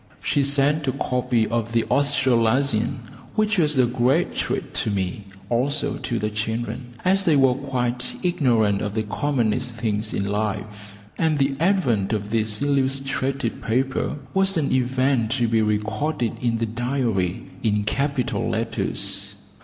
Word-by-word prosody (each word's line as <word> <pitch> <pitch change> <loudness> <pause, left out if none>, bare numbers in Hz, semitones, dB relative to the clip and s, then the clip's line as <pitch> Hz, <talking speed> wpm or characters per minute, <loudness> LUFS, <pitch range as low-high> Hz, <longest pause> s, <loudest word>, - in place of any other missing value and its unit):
She 145 - +2
sent 140 +2 +2
a 130 - +1
copy 125 -3 0
of 115 +1 -2
the 115 -1 +3
Australasian, 130 -2 +2 0.3
which 215 -2 +2
was 150 -3 +3
a 130 - +5
great 130 +7 +1
treat - - -3
to - - -1
me, 100 0 -2 0.2
also 140 +5 0
to 130 -3 -2
the 105 -1 -2
children, 115 +3 -4
as 195 +2 +4
they 165 -5 +3
were 135 -2 +5
quite 125 -2 -1
ignorant 115 - +2
of 105 -1 -3
the 110 - 0
commonest 120 +1 -1
things 110 -1 -1
in 100 - -2
life, 105 0 -4 0.2
and 160 -2 +2
the 135 0 +2
advent 140 - +2
of 105 -1 -3
this 110 -1 0
illustrated 135 -2 0
paper 130 +5 0 0.2
was 195 -1 +2
an 145 -3 0
event 130 -2 +1
to 120 -3 +1
be 115 0 +2
recorded 110 +5 -1
in 120 -2 +1
the 115 - 0
diary 115 -6 -1 0.2
in 105 -2 +1
capital 135 +4 -1
letters. - - -1
125 Hz, 145 wpm, -23 LUFS, 110-140 Hz, 0.3 s, a